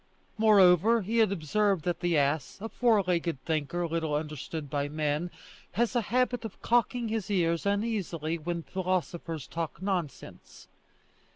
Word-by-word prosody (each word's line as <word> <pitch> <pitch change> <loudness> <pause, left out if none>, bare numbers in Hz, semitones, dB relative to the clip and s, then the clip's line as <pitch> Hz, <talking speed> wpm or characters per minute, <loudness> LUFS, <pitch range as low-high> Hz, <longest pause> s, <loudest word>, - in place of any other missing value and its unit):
Moreover 210 0 +5
he 225 +5 0
had 220 -3 +4
observed 195 +1 0
that 175 -1 -1
the 175 -2 +1
ass, 140 0 0
a 225 +3 -5
four 225 -5 +3
legged 170 -4 -1
thinker 160 +2 -1
little 160 -2 -1
understood 150 0 -4
by 145 0 -2
men, 150 +2 -1 0.4
has 235 +6 0
a 240 - +3
habit 245 +2 0
of 225 - -8
cocking 240 0 +1
his 215 -3 -2
ears 170 -2 +1
uneasily 195 -7 -1
when 170 +1 -3
philosophers 175 -5 -3
talk 165 -1 -5
nonsense. 175 -8 -5
175 Hz, 145 wpm, -29 LUFS, 160-215 Hz, 0.4 s, Moreover